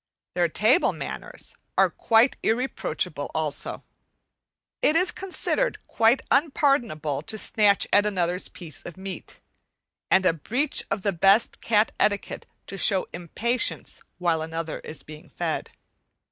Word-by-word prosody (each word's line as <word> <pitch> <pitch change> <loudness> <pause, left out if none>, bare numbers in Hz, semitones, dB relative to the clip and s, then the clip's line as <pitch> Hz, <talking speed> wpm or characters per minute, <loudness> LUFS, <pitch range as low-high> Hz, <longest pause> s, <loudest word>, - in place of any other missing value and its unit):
Their 175 -1 +2
table 215 - +3
manners - - -8 0.2
are - - +4
quite 230 +3 +3
irreproachable 250 +4 -1
also. - - -2 1.0
It 305 - +3
is 355 +2 +4
considered 390 +6 -1
quite 230 +3 +3
unpardonable 270 - +1
to 220 -1 -5
snatch 205 -1 +3
at 205 +1 +5
another's 180 -2 0
piece 165 -6 -7
of 175 - -9
meat, 190 0 -8 0.7
and 190 0 +4
a 180 - +4
breach 245 - -1
of 195 - -2
the 200 - +1
best 195 +6 +3
cat 215 -1 +2
etiquette 205 -1 0 0.2
to 195 - -6
show 190 -3 +3
impatience 230 +8 -2 0.2
while 170 -3 +1
another 160 0 -4
is 155 - -8
being 155 0 -12
fed. - - -3
200 Hz, 130 wpm, -25 LUFS, 175-240 Hz, 1.0 s, at